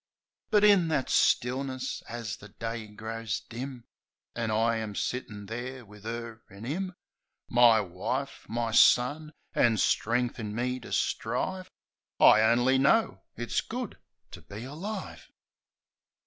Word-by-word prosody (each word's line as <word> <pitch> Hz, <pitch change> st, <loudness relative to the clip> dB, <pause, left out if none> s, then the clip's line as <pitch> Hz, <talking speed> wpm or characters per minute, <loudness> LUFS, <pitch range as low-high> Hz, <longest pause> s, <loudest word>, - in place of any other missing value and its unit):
But 210 Hz, -1 st, +4 dB
in 200 Hz, -5 st, +6 dB
that 150 Hz, -5 st, 0 dB
stillness, 130 Hz, +1 st, +1 dB
as 115 Hz, -3 st, -5 dB
the 105 Hz, -, -13 dB
day 115 Hz, +1 st, -5 dB
grows 110 Hz, +1 st, -4 dB
dim. 125 Hz, +1 st, -7 dB, 0.5 s
An' 115 Hz, -1 st, -2 dB
I 115 Hz, +1 st, +2 dB
am 110 Hz, -2 st, -4 dB
sittin' 105 Hz, -4 st, -4 dB
there 120 Hz, +3 st, -6 dB
wiv 105 Hz, 0 st, -15 dB
'er 115 Hz, -1 st, -5 dB
an' 100 Hz, +3 st, -10 dB
'im 185 Hz, +7 st, -3 dB, 0.3 s
— -, -, -44 dB
My 115 Hz, -3 st, +7 dB
wife, 100 Hz, +9 st, -4 dB
my 115 Hz, 0 st, -1 dB
son! 145 Hz, +7 st, +4 dB, 0.2 s
an' 115 Hz, -2 st, +3 dB
strength 120 Hz, +5 st, +1 dB
in 105 Hz, -2 st, -4 dB
me 125 Hz, +2 st, -1 dB
to -, -, -11 dB
strive, 185 Hz, +11 st, -1 dB, 0.5 s
I 110 Hz, -, +8 dB
only 120 Hz, +4 st, +4 dB
know 215 Hz, +12 st, +3 dB
— -, -, -55 dB
it's 120 Hz, 0 st, -1 dB
good 245 Hz, -2 st, -6 dB, 0.3 s
to -, -, -10 dB
be 105 Hz, +3 st, -9 dB
alive! 185 Hz, +10 st, -7 dB
120 Hz, 140 wpm, -29 LUFS, 110-135 Hz, 0.5 s, I